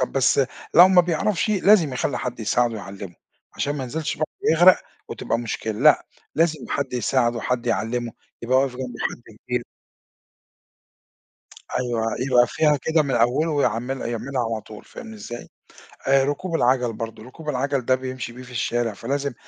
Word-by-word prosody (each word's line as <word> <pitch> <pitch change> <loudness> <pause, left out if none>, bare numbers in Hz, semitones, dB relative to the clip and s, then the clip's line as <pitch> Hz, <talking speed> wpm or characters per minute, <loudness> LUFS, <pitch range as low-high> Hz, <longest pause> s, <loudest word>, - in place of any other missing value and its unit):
طَب 130 - -1
بس 135 0 +3 0.3
لو 175 +2 +9
ما 185 -1 +6
بيعرفش، 175 +4 0
لازم 195 -6 +4
يخلّي 125 0 -1
حد 125 -1 -5
يساعدُه 115 +2 +1
ويعلمُه، 100 -3 -8 0.4
علشان 145 +1 -2
ما 135 - -3
ينزلش 155 +5 -3
البحر 155 - -1 0.2
ويغرق 175 +3 +6 0.3
وتبقى 115 - -2
مشكلة، 115 -1 -3
لأ، 150 +1 +5 0.3
لازم 160 -2 +1
حد 140 -2 -2
يساعدُه، 120 0 +1
حد 125 0 -2
يعلّمُه، 115 +2 -1 0.3
يبقى 125 +2 +3
واقف 135 -1 +1
جمبه 125 -2 -6
حد 115 -3 -13
كبير. 125 0 -3 2.1
أيوه 120 -3 -1 0.2
يبقى 125 -1 +4
فيها 150 +1 +2
كده 160 +4 +1
من 140 -3 -2
أوله، 125 +8 +2
ويعمل 135 -3 0
يعملها 120 +3 -3
على 110 - -2
طول 105 0 -12
فاهمني 225 -2 -10
إزاي، 120 - -8 0.6
آآ 135 0 +5
ركوب 155 +5 -2
العَجل 125 -4 +2
برضه، 110 0 -7
ركوب 150 +6 -9
العَجل 135 -1 -1
ده 130 - +4
بيمشي 130 -2 -6
بيه 125 +1 -10
في 125 - -13
الشارع، 120 -1 -1
فلازم 140 +6 -3
130 Hz, 160 wpm, -23 LUFS, 120-150 Hz, 2.1 s, لو